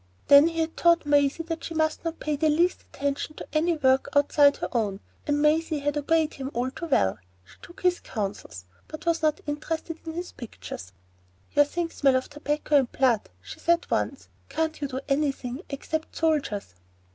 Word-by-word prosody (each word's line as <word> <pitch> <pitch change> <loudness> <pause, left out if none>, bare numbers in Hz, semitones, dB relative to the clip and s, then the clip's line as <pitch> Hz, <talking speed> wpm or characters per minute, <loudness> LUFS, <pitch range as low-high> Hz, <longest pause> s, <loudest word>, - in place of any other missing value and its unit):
Then 285 +2 +9
he 330 -1 -1
had 320 0 -2
taught 340 -2 +4
Maisie 290 +2 +3
that 330 0 -5
she 330 - -5
must 315 -1 0
not 330 -1 -4
pay 300 -1 -1
the 310 +2 +2
least 340 +4 +2
attention 280 +2 -3
to - - -8
any 325 +2 +2
work 265 -2 +3
outside 285 0 +5
her - - -4
own, 210 -5 -1 0.3
and 290 0 +1
Maisie 310 +1 +2
had 290 0 -1
obeyed 315 +1 +1
him 270 -1 -5
all 250 +2 0
too 335 - -6
well. 95 - +2 0.3
She - - -19
took 345 - -13
his 360 -1 +2
counsels, 200 - -5 0.2
but 310 - -9
was 335 -1 +1
not 310 -1 +1
interested 315 +2 -4
in 320 - -6
his 350 +2 -5
pictures. 95 - -9 0.6
"Your 290 0 +6
things 335 +3 -3
smell 270 -2 +3
of 260 +2 -1
tobacco 295 0 +1
and 260 -3 +1
blood," 250 -5 +2
she 95 - -10
said 340 0 +2
once. - - -1 0.2
"Can't 320 -1 -2
you 285 - -1
do 260 0 -4
anything 275 -2 -1
except 315 +3 -4
soldiers?" 290 - 0
295 Hz, 190 wpm, -26 LUFS, 270-320 Hz, 0.6 s, Then